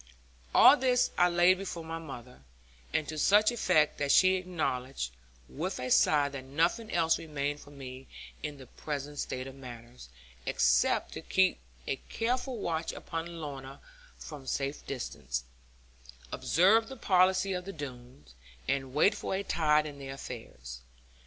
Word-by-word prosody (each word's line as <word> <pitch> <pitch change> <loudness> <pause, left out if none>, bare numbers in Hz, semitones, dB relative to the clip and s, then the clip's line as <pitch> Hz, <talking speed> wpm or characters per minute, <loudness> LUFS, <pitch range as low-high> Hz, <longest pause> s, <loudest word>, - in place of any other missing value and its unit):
All 280 - +9
this 255 -2 +2
I 180 0 +4
laid 175 +2 +4
before 180 -4 -5
my 165 0 -5
mother, 125 - -10 0.5
and 155 - 0
to 155 -1 -4
such 210 +7 +5
effect 180 -10 +2
that 140 -1 +1
she 185 +5 +6
acknowledged, 150 - -2 0.4
with 180 +6 -4
a 125 0 -4
sigh 145 -2 +5
that 140 -2 -7
nothing 165 - 0
else 165 -1 +2
remained 145 -2 -3
for 145 - -14
me 135 -2 -9 0.3
(in 150 -2 -5
the 130 - -11
present 145 +2 -6
state 130 0 -3
of 135 - -8
matters) 120 - -11 0.4
except - - +2
to - - -6
keep - - +2 0.3
a 135 - -1
careful 250 +2 -1
watch 165 -5 -2
upon 165 +1 -6
Lorna 135 -3 -7 0.4
from 145 -4 -10
safe 140 +2 -2
distance, 65 - -4 0.9
observe 215 +6 +4
the 265 - -8
policy 185 -1 +3
of 180 -1 -4
the 195 - -5
Doones, 125 - -10 0.3
and 135 -1 -1
wait 195 +7 +5
for 200 - -3
a 195 - -2
tide 155 -4 +2
in 145 -2 -8
their 135 0 -6
affairs. 65 - -9
150 Hz, 150 wpm, -30 LUFS, 135-180 Hz, 0.9 s, All